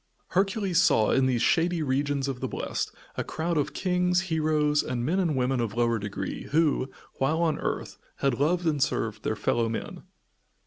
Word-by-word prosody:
Hercules 195 -2 +2
saw, 110 -10 +4
in 130 -1 +3
these 125 -3 +1
shady 170 -1 +2
regions 140 0 0
of 135 -2 -3
the - - -2
blest, - - -3 0.3
a - - 0
crowd 165 +2 -2
of 150 -1 0
kings, 180 -1 +1
heroes 155 -4 +1
and 120 -1 -3
men 175 +7 +1
and 170 -6 +1
women 130 0 +1
of 115 -3 -2
lower 115 -1 +2
degree 100 0 -5
who, 150 -3 +1 0.3
while 155 +5 +1
on 160 -3 +1
earth, - - -3 0.2
had 135 -3 0
loved 170 +5 +1
and 150 -3 +1
served 115 -6 0
their 110 - -1
fellow 115 +2 0
men. 115 - -5
150 Hz, 180 wpm, -27 LUFS, 125-170 Hz, 0.3 s, saw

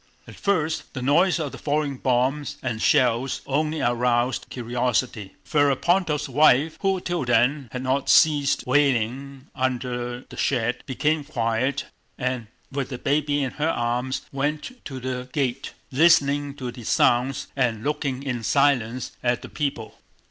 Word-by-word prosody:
At - - -10
first 160 -8 -1
the 130 - -4
noise 170 +7 +3
of 150 -4 -3
the - - -10
falling 145 -2 -1
bombs 130 +3 0
and 115 -4 -3
shells 125 +2 +2
only 155 +3 -1
aroused 120 +1 +1
curiosity. 120 -4 -2
Ferapóntov's 150 +2 +2
wife, 150 +2 +3
who 195 -1 +1
till 175 -3 -2
then 125 +3 +2
had 125 0 -5
not 130 +1 0
ceased 145 -3 +4
wailing 135 0 0
under 125 -2 -2
the - - -14
shed, 120 -2 0
became 145 +4 0
quiet 130 0 -1 0.3
and 125 -3 -2 0.2
with 140 -1 -3
the 130 - -5
baby 145 +1 0
in 130 - -2
her 155 +2 -1
arms 120 0 -1
went 150 - -3
to 135 -2 -6
the 125 0 -4
gate, 135 -2 -2 0.2
listening 145 -1 +3
to 130 -3 -5
the 120 -1 -11
sounds 125 +4 +2
and 120 -5 0
looking 140 -2 -2
in 125 -4 -3
silence 130 -2 +1
at 120 -1 0
the - - -8
people. 135 -7 -4
135 Hz, 145 wpm, -24 LUFS, 125-145 Hz, 0.3 s, ceased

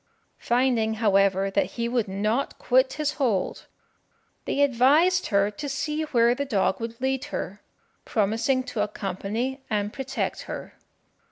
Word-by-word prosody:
Finding, 240 -3 +1
however, 195 -3 +2
that - - 0
he 235 0 0
would 235 -3 0
not 215 +7 -1
quit 260 +1 +2
his 300 -1 -1
hold, 215 -8 0 0.8
they 285 - 0
advised 285 +8 +4
her 200 0 +2
to 280 +8 -6
see 300 +3 -2
where 240 -5 +3
the 280 +3 -2
dog 205 -8 0
would 230 0 -6
lead 265 +1 -1
her, 205 -8 -5 0.4
promising 230 +5 +1
to 230 -4 -3
accompany 210 +6 -3
and 205 -1 -1
protect 270 -1 -3
her. - - -6
235 Hz, 140 wpm, -25 LUFS, 205-265 Hz, 0.8 s, advised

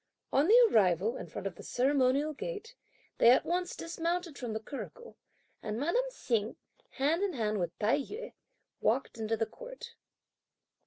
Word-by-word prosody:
On 280 +4 +4
the 475 +3 +8
arrival 195 +2 +3
in - - -6
front 170 - -7
of 185 -3 -4
the - - -9
ceremonial 275 +3 +2
gate, 450 - -6 0.5
they 235 - +7
at 250 - +5
once 355 +1 -1
dismounted 335 0 -2
from 240 -5 -4
the 220 - -2
curricle, 475 - -8 0.5
and 215 +1 -3
madame 475 - +1
Hsing, 230 - -1 0.4
hand 300 +6 +1
in 400 -3 0
hand 215 -5 -1
with 175 -2 -3
Tai 220 +6 +2
yü, 425 - -6 0.5
walked - - 0
into 225 0 -1
the 225 - +1
court. - - -10
280 Hz, 160 wpm, -31 LUFS, 220-365 Hz, 0.5 s, the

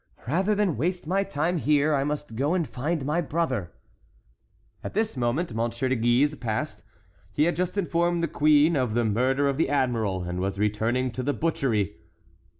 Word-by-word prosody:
"Rather 190 - +1
than 200 -6 +1
waste 175 +7 -1
my 190 +5 +1
time 170 -1 -1
here, 150 0 +2
I 135 -1 +2
must 145 -4 -4
go 145 +8 +1
and 170 -5 0
find 145 +3 -2
my 155 +5 +1
brother." 135 - -2 1.1
At - - -6
this 220 -3 0
moment 125 +6 -1
M. 115 +1 0
de 130 +3 -1
Guise 120 +5 +2
passed; 115 -6 -3 0.5
he 150 - +2
had 170 +2 +2
just 180 +2 -2
informed 170 -2 +1
the - - +2
queen 150 +2 +4
of 125 -5 0
the 120 -1 +2
murder 130 +6 +1
of 140 -1 0
the 160 - +1
admiral, 115 -9 0
and 90 +1 -4
was 95 +1 -2
returning 110 +5 0
to 130 - -4
the 145 +3 0
butchery. 115 - 0
140 Hz, 180 wpm, -26 LUFS, 120-165 Hz, 1.1 s, queen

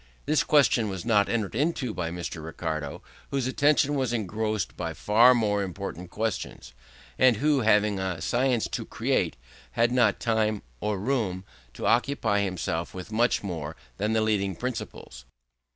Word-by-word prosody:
This 155 +1 +2
question 125 -7 +3
was 95 -1 -5
not 105 -4 +3
entered 110 -4 -1
into 135 -2 -1
by 85 -2 -3
Mr. 85 -2 -5
Ricardo, 80 -2 -4 0.3
whose 135 -3 -1
attention 145 +2 +2
was 130 -4 0
engrossed 110 -2 -2
by 85 -2 -4
far 115 +8 +5
more 105 -3 +1
important 95 -2 -5
questions, 100 - -4 0.5
and 130 -4 +5
who, 145 +3 +2
having 105 -3 +3
a 95 -3 -2
science 120 +6 +1
to - - -3
create, - - -1 0.4
had 115 +1 +2
not 125 -1 +3
time, 110 -2 0 0.2
or 105 +5 -1
room, 100 -5 -1 0.3
to - - -5
occupy 115 -5 +2
himself 85 -3 -3
with 95 +3 -8
much 120 +2 +2
more 80 -5 -5 0.2
than 105 +2 0
the 110 - +2
leading 100 -3 0
principles. 115 - -6
105 Hz, 150 wpm, -27 LUFS, 95-120 Hz, 0.5 s, far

